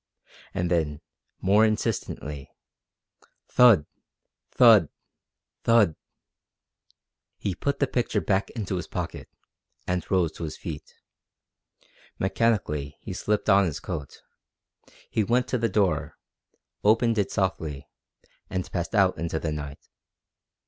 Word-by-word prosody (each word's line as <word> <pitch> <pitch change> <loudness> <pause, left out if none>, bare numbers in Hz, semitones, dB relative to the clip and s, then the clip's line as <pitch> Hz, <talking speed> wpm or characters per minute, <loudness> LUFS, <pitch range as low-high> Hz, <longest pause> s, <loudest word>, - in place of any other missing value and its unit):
And 90 0 -1
then, 75 -4 0 0.4
more 100 +3 +4
insistently: 105 - -2 1.0
Thud! 115 -11 +6 0.6
Thud! - - +6 0.7
Thud! 115 -8 +4 1.4
He 100 - -2
put 140 +9 -2
the 140 - +2
picture 120 -5 0
back 95 +3 0
into 100 -5 -3
his - - -5
pocket, - - -5 0.6
and 90 -2 -1
rose 90 -4 +2
to - - -8
his 80 -1 -5
feet. 75 -4 -8 1.2
Mechanically 95 -9 0
he 95 - -7
slipped 105 +2 -1
on 100 -1 +5
his 80 -5 -3
coat. 70 - -7 0.8
He 110 - 0
went 125 +4 +1
to 125 - 0
the 115 0 +1
door, 90 -7 0 0.7
opened 115 +1 +3
it 100 - +1
softly, 80 -8 -2 0.6
and 95 -1 -4
passed 85 +4 -3
out 95 -5 +3
into 85 0 -2
the 80 0 -2
night. 75 -1 -7
95 Hz, 115 wpm, -26 LUFS, 80-110 Hz, 1.4 s, Thud